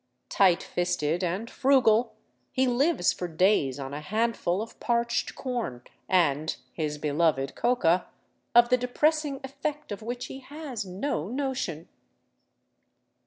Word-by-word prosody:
Tight 185 -3 +4
fisted 175 -1 -1
and 185 +6 -2
frugal, 245 -4 +3 0.4
he 260 - +2
lives 255 - +2
for 180 - -4
days 165 -6 +2
on 135 0 -6
a 145 - -4
handful 215 -1 0
of 225 +2 -7
parched 235 0 0
corn 235 - -4 0.3
and 160 -4 +2 0.2
his 150 -2 -2
beloved 145 -2 +1
coca, 185 -8 +2 0.5
of 240 0 +7
the 250 - +5
depressing 290 +3 +1
effect 280 +2 -5
of 205 - -5
which 245 +2 -4
he 265 - -8
has 270 -6 -6
no 185 - -2
notion. 245 - -3
215 Hz, 125 wpm, -27 LUFS, 170-255 Hz, 0.5 s, of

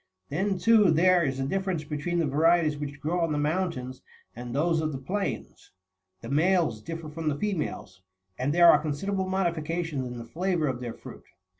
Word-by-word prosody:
Then, 190 +6 -1
too, 215 0 +5
there 175 +2 +4
is 135 -3 -1
a 135 - -1
difference 190 0 -2
between 150 +4 -3
the 165 - +2
varieties 155 +2 +3
which 145 -1 -6
grow 160 +5 -1
on 165 -2 0
the 150 - 0
moun 165 +5 0
tains 130 -3 -8 0.3
and 120 +1 -7
those 160 +2 +2
of 155 -1 -2
the - - -3
plains; 145 - -4 0.5
the 115 - -8
males 160 - +2
differ 165 +4 -6
from 155 +1 -3
the 145 - -2
females, 150 - -4 0.3
and 130 +6 -1
there 170 +2 +7
are - - +4
considerable 185 +6 -2
modifications 165 -6 -1
in 125 0 -7
the 115 - -7
flavour 175 +5 -1
of 130 -4 -2
their 120 -2 -6
fruit. - - -12
160 Hz, 190 wpm, -27 LUFS, 140-175 Hz, 0.5 s, there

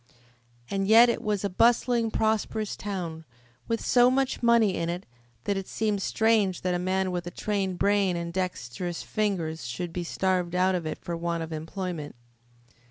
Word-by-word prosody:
And 195 -1 0
yet 230 +3 +8
it - - -1
was 210 -2 -1
a - - +2
bustling, 235 +3 +3
prosperous 220 -1 0
town, 175 -5 -5 0.4
with 230 0 -2
so 245 0 +5
much 265 0 0
money 235 -4 +4
in 165 0 -2
it 175 +2 -4 0.4
that 200 +6 0
it 195 - -4
seemed 210 -3 -1
strange 220 -3 +2
that 180 -1 0
a 175 - 0
man 185 +1 0
with 175 -1 -3
a - - -2
trained 195 -1 -2
brain 200 -2 +2
and 170 0 -4
dexterous 175 -2 -3
fingers 170 - -2
should 170 +7 -4
be 180 - -3
starved 180 0 0
out 185 +1 +3
of 175 -3 -2
it - - -3
for 170 - -5
want 170 0 -2
of 160 0 -6
employment. 165 -1 -5
190 Hz, 175 wpm, -27 LUFS, 175-215 Hz, 0.4 s, yet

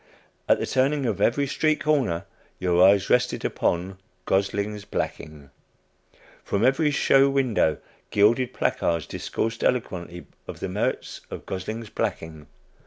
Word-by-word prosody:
At - - +6
the - - -2
turning 135 +2 +1
of 100 -4 -1
every 140 +6 +2
street 155 +3 +1
corner 130 - +1 0.3
your 90 -1 +3
eyes 100 0 +5
rested 125 0 +1
upon 95 +2 -1 0.3
"Gosling's 100 +2 -1
Blacking." 75 -7 -5 0.9
From 100 +3 0
every 135 +4 +3
show 140 -1 +4
window 130 - +1 0.3
gilded 115 +5 +3
placards 85 -2 0
discoursed 115 0 -3
eloquently 90 -8 -2 0.2
of - - -8
the - - -4
merits - - -2
of - - -8
"Gosling's 110 +4 -5
Blacking." 80 -2 -4
105 Hz, 125 wpm, -25 LUFS, 90-130 Hz, 0.9 s, At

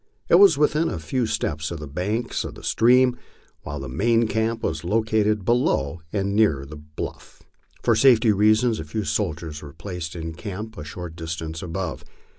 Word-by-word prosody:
It 170 - +7
was 195 -7 +7
within 150 +2 +2
a - - -3
few 110 +10 -1
steps 75 -6 -2
of 85 - -5
the 75 - -6
bank 100 - -3
of - - -7
the - - -12
stream, 125 +2 +4 0.4
while 75 -1 -6
the 70 - -6
main 115 - +2
camp 115 +1 -1
was 80 0 -2
located 105 +1 +1
below 85 - +1
and 100 -1 -1
nearer 80 -11 +3
the 75 +2 -10
bluff. 75 +1 -8 0.4
For 115 - +4
safety 115 -1 +5
a 110 0 +3
few 80 +8 -3
soldiers 80 -7 -2
were 75 -1 -10
placed 85 -1 -6
in 80 -1 -5
camp 105 +5 -7
a 75 - -7
short 85 +2 -7
distance 80 -1 -5
above. 85 -4 -4
95 Hz, 175 wpm, -24 LUFS, 80-115 Hz, 0.4 s, It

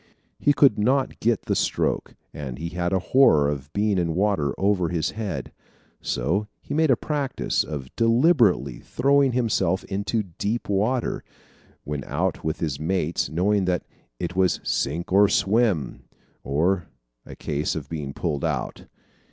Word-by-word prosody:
He 145 - +3
could 135 -7 +4
not 130 +5 +1
get 115 -1 +1
the - - -1
stroke - - -1 0.2
and 65 -5 -6
he 85 +3 -4
had 85 0 -2
a 95 - +3 0.2
horror 80 - +6
of 70 -1 -4
being 100 0 +1
in 85 -2 -1
water 95 -7 +1
over 95 -3 +1
his 85 -2 -1
head. 110 -2 -4 0.5
So 100 +8 -1
he - - -7
made 160 +1 +2
a 130 - +6
practise 145 0 -1
of 70 -4 -7
deliberately 115 - +3
throwing 140 0 +2
himself 100 -7 +1
into 100 +3 -2
deep 100 +5 -3
water, 110 +6 0 0.6
when 75 -1 -4
out - - -2
with 80 0 -3
his 75 -5 -2
mates, 85 0 -1
knowing 95 +4 +1
that 90 -1 -1 0.3
it 90 +1 -4
was 95 -1 +2
"sink 85 +6 -2
or 100 +1 +6
swim," 100 - +1 0.4
or 85 +7 0 0.4
a - - -11
case 75 +1 -2
of 75 -4 -5
getting 75 -4 -5
pulled 75 -5 -2
out. - - -3
95 Hz, 150 wpm, -24 LUFS, 80-110 Hz, 0.6 s, horror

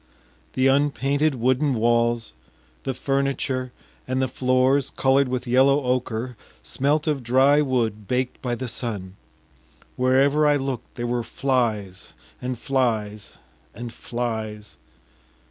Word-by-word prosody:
The 130 - +1
unpainted 140 +1 +2
wooden 130 +3 +1
walls, 115 - +1 0.5
the 135 - -2
furniture, 135 -2 -1 0.4
and 130 0 -1
the 130 - +1
floors 130 +2 +2
colored 135 +1 +2
with 125 0 -3
yellow 135 +3 +4
ocher 125 -2 -2 0.3
smelt 145 +3 0
of 150 -4 0
dry 135 +5 +4
wood 115 -7 -1
baked 125 0 -1
by 125 -2 -1
the 130 +2 -5
sun. 100 -6 -5 0.8
Wherever 135 +4 +3
I 145 - +4
looked 135 -4 -4
there 120 - -3
were 120 0 0
flies 115 -6 -2 0.3
and 125 0 -3
flies 110 -6 -1 0.4
and 120 +1 -7
flies.... 110 - -5
130 Hz, 120 wpm, -24 LUFS, 120-135 Hz, 0.8 s, yellow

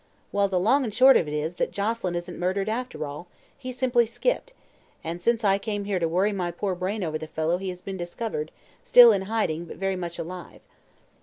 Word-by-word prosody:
Well, 200 0 +2
the 190 -2 0
long 260 +10 +3
and 225 - -3
short 260 +5 +7
of 165 - +3
it 150 - -4
is 160 +4 -3
that - - -1
Joselyn 205 -3 -2
isn't 175 +1 -5
murdered, 190 +3 -1
after 235 -6 -3
all. 150 +5 -8 0.3
He 255 -2 -7
simply 245 -2 +2
skipped, - - -1 0.5
and 170 +2 -5
since 235 +4 +1
I 195 -1 +3
came 205 0 -3
here 200 -2 -1
to 165 - +1
worry 185 +6 +1
my 185 -3 -2
poor 185 +3 -2
brain 185 +3 -3
over 155 -2 -2
the 155 - -7
fellow 160 +2 -1
he 190 0 -4
has 180 0 -8
been 195 -1 -5
discovered, 175 -2 -4 0.3
still 240 -2 +8
in 200 -3 +1
hiding 175 -7 -1
but - - -10
very 195 0 -1
much 175 -2 -5
alive." 175 +1 -8
190 Hz, 220 wpm, -25 LUFS, 175-225 Hz, 0.5 s, still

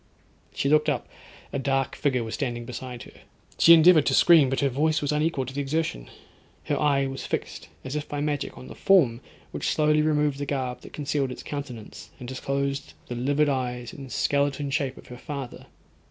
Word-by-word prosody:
She - - -2
looked 150 +1 +4
up, 140 -4 -2 0.5
a 140 - -1
dark 135 -1 0
figure 130 -5 0
was 110 0 -6
standing 120 -4 -3
beside 125 0 -7
her; - - -13 0.5
she 170 - +7
endeavoured 165 -2 +6
to - - +3
scream, 160 -6 +6
but 135 - -1
her 140 - +3
voice 150 +4 +1
was 145 0 -1
unequal 150 -2 0
to 130 - -8
the 145 - -2
exertion; 140 - -2 0.5
her - - -1
eye 140 -2 +3
was 135 0 -5
fixed, - - -4 0.2
as 130 +2 -4
if 150 0 -4
by 145 - -3
magic, 145 -1 -2
on - - -10
the - - -9
form 140 -12 +3 0.3
which, - - -2
slowly 150 0 +3
removed 150 -2 +1
the 145 - -3
garb 130 -3 -3
that - - -13
concealed 140 -2 -1
its - - -8
countenance, 130 -7 -7
and 125 - -9
disclosed 140 +1 -3 0.2
the 120 - -3
livid 145 +5 +1
eyes 125 -3 -2
and 135 -3 -9
skeleton 140 0 0
shape 140 -3 -1
of - - -13
her 125 0 -9
father. 140 -4 -7
140 Hz, 195 wpm, -26 LUFS, 130-150 Hz, 0.5 s, she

